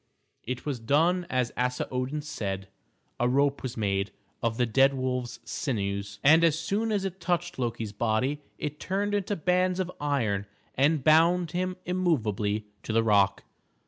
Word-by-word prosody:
It 125 +1 -5
was 140 -5 -2
done 165 +9 +2
as 125 -2 0
Asa 125 0 -1
Odin 130 +4 -2
said. 100 -10 -4 0.5
A 120 - +2
rope 140 +2 +2
was 125 -2 -5
made 100 -2 0 0.3
of 115 -1 0
the 125 - +3
dead 135 +4 +4
wolves' 125 -2 -2
sinews, 100 -4 -3
and 160 +4 +7
as 160 -2 +4
soon 205 +7 -1
as 200 -2 0
it 190 0 -4
touched 175 -2 -1
Loki's 115 -3 -2
body 120 +7 0 0.2
it 150 0 -4
turned 200 +2 -1
into 205 0 0
bands 180 +2 +1
of 180 -1 -1
iron 110 -9 0 0.3
and 145 +1 +2
bound 165 +2 +4
him 185 +1 -1
immovably 110 - 0 0.2
to - - -5
the 115 +1 +3
rock. 100 -3 +3
135 Hz, 160 wpm, -28 LUFS, 115-170 Hz, 0.5 s, and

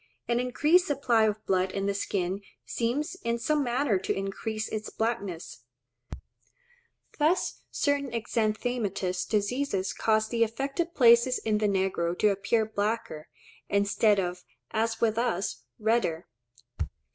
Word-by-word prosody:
An 235 0 +1
increased 300 +9 +3
supply 245 -7 +3
of 215 0 -2
blood 185 0 +1
in 195 0 -2
the 200 - +1
skin 195 -1 -2 0.2
seems 250 +8 -1
in 235 0 0
some 295 +5 +1
manner 245 -4 +1
to - - -3
increase 215 +3 -3
its 215 0 -4
blackness; 200 - -3 1.6
thus 315 +5 +1
certain 285 -1 0
exanthematous 215 -5 -1
diseases 210 -2 0
cause 220 0 +1
the 230 -1 +2
affected 275 +9 -2
places 235 0 +6
in 215 -1 0
the 210 - +2
negro 190 -3 0
to 210 - +4
appear 210 +3 +1
blacker, 210 -7 -3 0.4
instead 200 +1 +3
of, 180 -1 -3 0.3
as 225 0 0
with 225 0 +2
us, 200 -6 -1
redder. 220 -7 0
220 Hz, 125 wpm, -28 LUFS, 195-240 Hz, 1.6 s, places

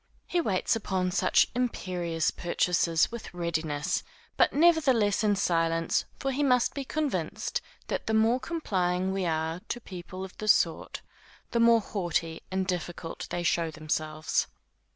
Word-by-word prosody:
He 350 - 0
waits 195 - +1
upon 190 -4 -1
such 190 - +4
imperious 180 -9 -1
purchasers 170 0 +1
with 235 -1 -7
readiness, 165 0 -1 0.3
but - - +4
nevertheless 275 -11 +4
in 205 -1 +3
silence, 165 -3 +1
for 270 - -1
he 270 +2 -1
must 250 -4 +3
be 280 - -3
convinced 260 - -2 0.2
that - - -3
the 220 - +1
more 225 +3 +4
complying 190 - -1
we 190 -2 -1
are 160 +1 -1
to 240 - -2
people 185 -2 -7
of 190 - -12
this 215 0 +6
sort, - - -1 0.5
the 235 - +1
more 230 -1 +6
haughty 170 -5 -2
and 190 0 -1
difficult 175 -2 -4
they 175 - -2
show 170 -1 +1
themselves. 155 0 -1
185 Hz, 145 wpm, -28 LUFS, 165-230 Hz, 0.5 s, this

